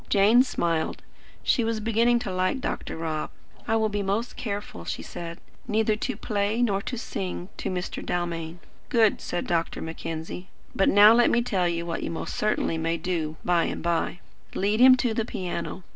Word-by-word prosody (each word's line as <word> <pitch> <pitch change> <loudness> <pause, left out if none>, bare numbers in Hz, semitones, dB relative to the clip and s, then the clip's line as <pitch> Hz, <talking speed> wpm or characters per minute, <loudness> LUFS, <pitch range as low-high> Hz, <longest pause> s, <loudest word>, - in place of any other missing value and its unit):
Jane 210 +4 +6
smiled. 165 -10 -1 0.4
She 240 - +2
was 225 0 -1
beginning 230 +2 +3
to 195 - -4
like 185 +8 0
Dr. 265 - -4
Rob. 160 -2 -3 0.4
"I 225 - +2
will 220 -1 +2
be 205 -1 -2
most 200 +5 -1
careful," 205 - -5
she 80 - -4
said, 170 - -7 0.3
"neither 220 -1 +2
to 245 +4 -3
play 210 +2 0
nor 200 -4 +1
to 245 +4 -4
sing 190 -4 -4
to - - -3
Mr. 185 -1 -4
Dalmain." 170 -1 -3 0.3
"Good," 225 -3 +3
said 175 - -3
Dr. 165 -1 -1
Mackenzie. 160 +2 -6 0.3
"But 195 - +3
now 205 +2 +8
let 240 +1 +5
me 240 - +2
tell 190 -7 +1
you 170 0 -2
what 165 -1 -3
you - - -3
most 165 - -4
certainly 210 -6 0
may 165 +1 0
do, 160 -2 -2
by 175 -2 +3
and - - -4
by. 170 +1 -1 0.3
Lead 205 +3 +1
him 255 +1 +8
to 245 -3 0
the 225 - 0
piano. 185 -3 -4
195 Hz, 185 wpm, -26 LUFS, 170-220 Hz, 0.4 s, now